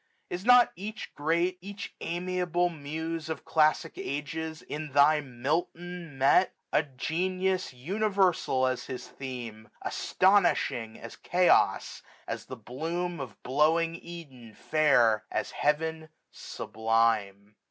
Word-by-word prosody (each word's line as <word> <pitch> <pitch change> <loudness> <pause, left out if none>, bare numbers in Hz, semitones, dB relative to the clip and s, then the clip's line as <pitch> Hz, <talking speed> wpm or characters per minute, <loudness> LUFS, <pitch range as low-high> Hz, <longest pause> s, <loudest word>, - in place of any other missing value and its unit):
Is 180 +1 -4
not 245 +1 +7
each 215 +5 -7
great, 170 +5 0
each 200 +1 -7
amiable 175 0 0
Muse 160 +1 -5
Of 160 -3 -5
classic 155 +1 +2
ages 160 +3 -4
in 150 -2 -6
thy 150 +2 +5
Milton 160 +5 -3
met? 140 +8 +4 0.2
A - - +5
genius 185 +6 -1
universal 185 -1 +1
as 130 -1 -1
his 125 -1 -6
theme 120 -5 -7
j - - -24
Astonishing 160 - +2
as - - -10
Chaos; 180 0 +2 0.3
as - - -4
the 130 - -8
bloom 165 +9 -4
Of 135 -3 -8
blowing 160 +5 +2
Eden 140 -11 -11
fair; 120 -8 +3
as - - -2
Heaven 160 +2 -1 0.2
sublime. 110 -2 -1
155 Hz, 115 wpm, -29 LUFS, 130-175 Hz, 0.3 s, not